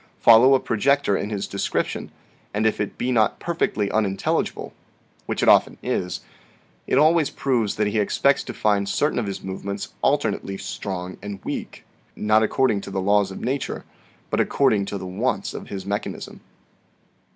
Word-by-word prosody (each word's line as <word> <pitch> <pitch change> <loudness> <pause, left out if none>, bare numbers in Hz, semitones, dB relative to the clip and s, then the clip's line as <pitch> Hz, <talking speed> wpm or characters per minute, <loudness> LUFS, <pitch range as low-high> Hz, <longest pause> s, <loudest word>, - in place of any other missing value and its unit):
Follow 120 +4 +7
a - - +3
projector 130 -1 +2
in 100 - -2
his 100 -2 -2
description, 100 - -2 0.5
and 110 +1 +1
if 110 - +1
it 105 - -4
be 125 - -1
not 110 -4 +2
perfectly 110 -12 -1
unintelligible, 100 -3 -1 0.5
which - - -1
it - - +2
often - - +5
is, 90 0 -2 0.7
it - - +2
always 155 +1 +4
proves 120 -7 0
that 105 - +1
he 105 +1 0
expects 140 +6 +2
to - - -6
find 100 -2 +1
certain 145 +5 +1
of 110 - -2
his 100 - -5
movements 100 +1 -5
alternately 95 0 0
strong 90 -2 -5
and 100 -1 -6
weak - - -5 0.3
not 110 +1 +3
according 110 -1 +2
to - - -8
the 95 - -2
laws 100 +1 +3
of 95 - -8
nature 135 +2 -3 0.5
but - - +1
according 110 -8 +2
to 100 - -4
the 95 - -7
wants 100 +3 -2
of - - -7
his 95 -1 -6
mechanism. 100 +1 -4
105 Hz, 165 wpm, -23 LUFS, 100-125 Hz, 0.7 s, Follow